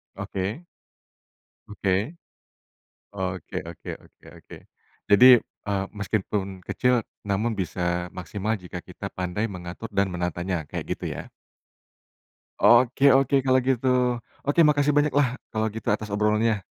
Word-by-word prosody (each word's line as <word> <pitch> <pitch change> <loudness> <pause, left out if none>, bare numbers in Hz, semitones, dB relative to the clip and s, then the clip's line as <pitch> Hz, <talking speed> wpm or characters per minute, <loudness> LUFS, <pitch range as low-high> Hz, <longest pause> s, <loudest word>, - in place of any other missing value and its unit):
Oke. 100 - -4 1.1
Oke. 100 -2 -2 1.2
Oke 95 -2 -4
oke - - -11 0.2
oke - - -22
oke. - - -13 0.5
Jadi, 100 +5 +8 0.4
eee, 100 -1 0
meskipun 100 -2 -2
kecil 125 +6 +1 0.3
namun 110 +4 0
bisa 90 0 -4 0.4
maksimal 105 +4 -2
jika 90 0 -7
kita 95 +2 -7
pandai 90 +4 -2
mengatur 90 +4 -7
dan 100 0 +2
menatanya 90 0 -2
kayak - - -4
gitu - - -9
ya? - - -6 1.4
Oke 130 +3 +5
oke 135 0 +3
kalau 130 0 +3
gitu. 125 -1 +2 0.3
Oke 145 +4 +2
makasih 145 0 +3
banyaklah 145 -3 +2
kalau 110 0 0
gitu, 115 - -6
atas 105 -1 0
obrolannya. 105 +1 +2
105 Hz, 120 wpm, -25 LUFS, 95-125 Hz, 1.4 s, Jadi